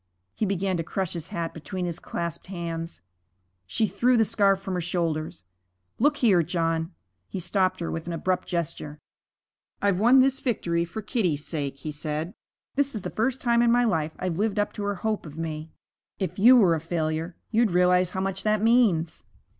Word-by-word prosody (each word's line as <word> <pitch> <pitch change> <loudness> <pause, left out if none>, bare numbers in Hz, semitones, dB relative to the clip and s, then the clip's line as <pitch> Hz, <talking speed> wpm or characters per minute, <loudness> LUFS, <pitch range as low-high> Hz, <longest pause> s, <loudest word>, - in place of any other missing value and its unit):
He 215 - -1
began 190 -1 0
to 165 - -2
crush 190 +1 -3
his 165 -2 -5
hat 165 -1 -4
between 180 +3 -5
his 175 -1 -3
clasped 170 -1 -5
hands. 165 - -5 0.6
She 220 - +1
threw 240 +6 +2
the 225 - +4
scarf 195 -2 +3
from 195 -1 -5
her 180 - -1
shoulders. 165 - -2 0.6
'Look 290 +4 +3
here, 200 -8 +4
John 165 0 -1 0.2
' 90 0 -49
He 190 - -4
stopped 185 +1 +1
her 170 - -2
with 165 +1 -5
an 175 - -3
abrupt 185 +3 -1
gesture. 155 -3 -3 0.8
'I've 200 -2 +1
won 240 +5 +6
this 270 +1 +3
victory 170 -9 0
for 205 +6 -7
Kitty's 180 - 0
sake,' 140 -4 -3
he 155 - -2
said. 155 +3 -4 0.4
'This 280 -2 0
is 210 - -3
the - - -4
first 245 +4 -1
time 235 -1 +3
in 235 -1 +4
my 245 +1 +4
life 160 -9 0
I've 185 -1 -3
lived 210 -1 0
up 205 0 0
to 205 - -5
her 205 0 -1
hope 215 -2 -2
of 150 +1 -11
me. 160 -1 -4 0.5
If 185 -1 -3
you 240 +6 +8
were 190 -8 +5
a 160 - 0
failure 165 +1 -2 0.2
you'd 230 0 +3
realize 180 0 +3
how 190 +1 -3
much 195 0 -2
that 215 0 +1
means.' 220 -9 +3
180 Hz, 195 wpm, -26 LUFS, 165-215 Hz, 0.8 s, you